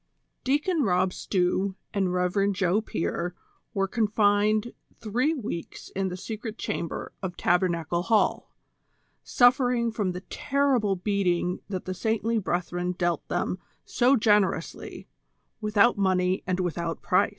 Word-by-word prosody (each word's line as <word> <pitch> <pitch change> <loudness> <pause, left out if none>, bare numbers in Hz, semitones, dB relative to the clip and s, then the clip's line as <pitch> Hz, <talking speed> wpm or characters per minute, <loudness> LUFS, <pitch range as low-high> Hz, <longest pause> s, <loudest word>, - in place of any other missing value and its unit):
IjEACOX 295 +4 +1
ROB 185 -2 +2
STEW 190 +1 0 0.2
and 195 -3 +1
Rev. 180 +3 +1
Joe 190 +2 +1
Pier 175 -3 -3 0.4
were 195 -1 +1
confined 210 0 +2 0.3
three 250 +9 0
weeks 210 - -6
in 195 0 -2
the 180 0 -4
secret 220 +3 -6
chamber 170 - -4
of 180 -3 -5
Tabernacle 170 -2 +1
Hall, 220 +3 +1 0.7
suffering 245 -1 +3
from 205 -5 -1
the 180 - -6
terrible 255 -4 +1
beating 180 -2 0
that 185 -2 -4
the 185 - -3
saintly 225 +3 0
brethren 180 -1 -2
dealt 175 -3 -1
them 185 - -1 0.3
so 250 +3 +3
generously, 210 -7 0 0.5
without 210 +1 +3
money 185 -1 +2
and 185 0 0
without 170 -1 -3
price. 190 +1 +3
195 Hz, 125 wpm, -27 LUFS, 180-220 Hz, 0.7 s, suffering